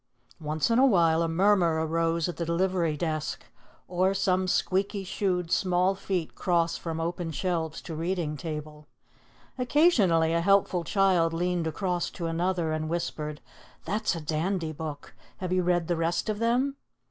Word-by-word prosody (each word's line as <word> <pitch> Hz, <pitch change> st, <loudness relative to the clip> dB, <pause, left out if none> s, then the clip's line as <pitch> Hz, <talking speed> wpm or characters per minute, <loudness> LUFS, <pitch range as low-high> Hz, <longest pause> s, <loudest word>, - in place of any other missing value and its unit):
Once 155 Hz, +5 st, -1 dB
in 230 Hz, -, +4 dB
a 270 Hz, -, +6 dB
while 170 Hz, -7 st, +4 dB
a 165 Hz, -, +1 dB
murmur 175 Hz, 0 st, +3 dB
arose 165 Hz, +1 st, 0 dB
at 175 Hz, -, -5 dB
the 170 Hz, -, -2 dB
delivery 170 Hz, -2 st, 0 dB
desk, 155 Hz, -1 st, -3 dB, 0.4 s
or 185 Hz, +2 st, +1 dB
some 185 Hz, -1 st, +1 dB
squeaky 195 Hz, +2 st, 0 dB
shoed 180 Hz, -2 st, -1 dB
small 185 Hz, 0 st, +2 dB
feet 190 Hz, -4 st, -3 dB
crossed 170 Hz, -2 st, 0 dB
from 165 Hz, -1 st, -4 dB
open 170 Hz, +1 st, -3 dB
shelves 160 Hz, 0 st, -2 dB
to 165 Hz, -, -7 dB
reading 165 Hz, -1 st, -2 dB
table. 150 Hz, -1 st, -7 dB, 0.7 s
Occasionally 220 Hz, -, +3 dB
a 170 Hz, -, +2 dB
helpful 190 Hz, -1 st, +3 dB
child 180 Hz, -2 st, +2 dB
leaned 175 Hz, 0 st, 0 dB
across 175 Hz, +2 st, -1 dB
to 170 Hz, -, -6 dB
another 170 Hz, 0 st, 0 dB
and 155 Hz, 0 st, -2 dB
whispered, 155 Hz, -3 st, -3 dB, 0.4 s
"That's 210 Hz, -2 st, 0 dB
a 165 Hz, -, -5 dB
dandy 160 Hz, +2 st, -1 dB
book. 155 Hz, -1 st, -7 dB, 0.2 s
Have 185 Hz, -1 st, -3 dB
you 185 Hz, -, +3 dB
read 175 Hz, -2 st, +1 dB
the 175 Hz, -, +1 dB
rest 170 Hz, +4 st, -1 dB
of 210 Hz, -1 st, -2 dB
them?" 250 Hz, +4 st, +1 dB
175 Hz, 160 wpm, -27 LUFS, 165-190 Hz, 0.7 s, a